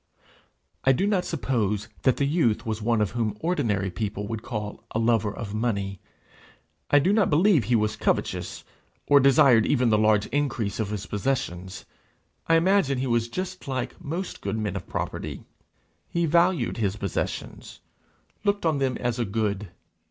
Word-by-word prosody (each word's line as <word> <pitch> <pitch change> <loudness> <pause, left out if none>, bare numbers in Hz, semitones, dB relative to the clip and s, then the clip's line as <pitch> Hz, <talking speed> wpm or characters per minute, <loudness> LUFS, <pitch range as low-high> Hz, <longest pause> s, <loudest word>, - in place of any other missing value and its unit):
I 135 - +5
do 190 - +1
not 195 -3 +1
suppose 105 - -1
that 130 - +3
the 140 - +1
youth 135 -7 +1
was 110 -1 -3
one 115 0 +1
whom 105 0 -1
ordinary 115 - 0
people 105 +2 -3
would 110 0 -4
call 105 -4 -5
a - - -3
lover 115 -2 +2
of 105 -1 -6
money; 100 -4 -2 0.9
I 145 - +5
do 180 +8 +3
not 210 -3 +3
believe 160 - +4
he 120 - +2
was 110 -1 +1
covetous, - - -1 0.4
or 145 0 +6
desired 130 -4 +5
even 125 -4 +2
the 105 - +4
large 105 -1 +3
increase 120 -9 -1
of 110 -3 -1
his 105 -1 -4
possessions; 100 -6 -3 0.6
I 165 - +5
imagine 165 -5 +3
he 130 - -1
was 120 -2 +1
just 185 +3 -5
like 130 -2 -4
most 170 +6 -4
good - - -2
men 105 -3 -2
of 95 - -6
property: - - -4 0.7
he 170 0 0
valued 170 +1 +2
his 100 -4 0
possessions 100 -3 -4 0.6
looked 200 -3 0
on 155 -3 +2
them 135 -2 0
as 120 -1 -2
a - - +2
good. 105 -1 -2
120 Hz, 165 wpm, -25 LUFS, 105-145 Hz, 0.9 s, or